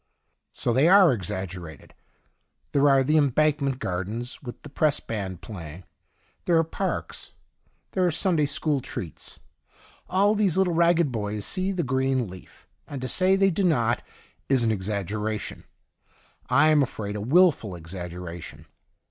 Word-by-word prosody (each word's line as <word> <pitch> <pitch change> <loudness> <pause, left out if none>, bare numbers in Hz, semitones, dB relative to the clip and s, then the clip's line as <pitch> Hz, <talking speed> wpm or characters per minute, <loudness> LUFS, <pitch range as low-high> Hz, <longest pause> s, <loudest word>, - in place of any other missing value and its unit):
So 120 - -1
they 135 +6 +4
are 190 -7 +7
exag 95 -2 -4
gerated: 85 -5 -10 0.8
there 145 0 +4
are 135 -1 +5
the 150 +4 +2
Embank 150 +1 +2
ment 135 -2 -1
Gardens 105 +4 -4
with 120 -3 -8
the 150 - -9
Press 150 +1 +1
Band 95 -6 -5
playing; 90 -4 -9 0.6
there 170 - +3
are 165 - +4
parks; 185 +4 -4 0.6
there 185 - 0
are 180 - +4
Sunday 165 -3 +1
school 145 0 0
treats. 90 -9 -8 0.7
All 200 +3 +3
these 205 -5 +1
little 190 -2 +2
ragged 170 -3 +3
boys 105 -2 -3
see 185 +1 -1
the 180 -3 -1
green 130 -2 0
leaf, 90 0 -14 0.2
and 140 - -6
to 130 - -4
say 185 +8 +3
they 195 0 +3
do 195 +3 -1
not 120 -9 +2 0.5
is 130 -3 +3
an 115 - +2
exaggeration 105 +1 -3 0.5
— - - -35
I 155 +2 +5
am 155 -1 +5
afraid 105 -6 -3
a 105 - -4
wilful 135 - +3
exaggeration. 85 0 -8
130 Hz, 155 wpm, -25 LUFS, 100-165 Hz, 0.8 s, are